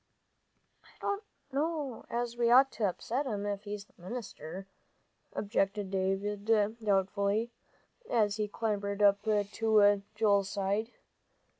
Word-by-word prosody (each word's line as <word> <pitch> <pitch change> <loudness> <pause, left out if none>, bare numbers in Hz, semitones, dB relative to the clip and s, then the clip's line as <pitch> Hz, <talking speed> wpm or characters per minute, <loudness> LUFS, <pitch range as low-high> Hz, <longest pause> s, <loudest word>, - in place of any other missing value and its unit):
"I - - -22
don't 405 0 -1 0.3
know 290 -3 -2
as 235 0 -2
we 240 -1 +2
ought 265 +3 +7
to 220 - -1
upset 255 +9 -3
him 205 -4 -2
if 205 0 -3
he's 205 0 -5
the 180 - -25
minister," 190 -4 -7 0.7
objected 200 -1 -1
David, 195 +2 -1 0.4
doubtfully, 200 +3 +1 0.6
as 210 -3 +2
he 210 -1 0
clambered 205 -1 -1
up 200 0 +5
to 210 -1 +3
Joel's 200 -3 +3
side. 200 +3 -1
205 Hz, 120 wpm, -31 LUFS, 200-230 Hz, 0.7 s, ought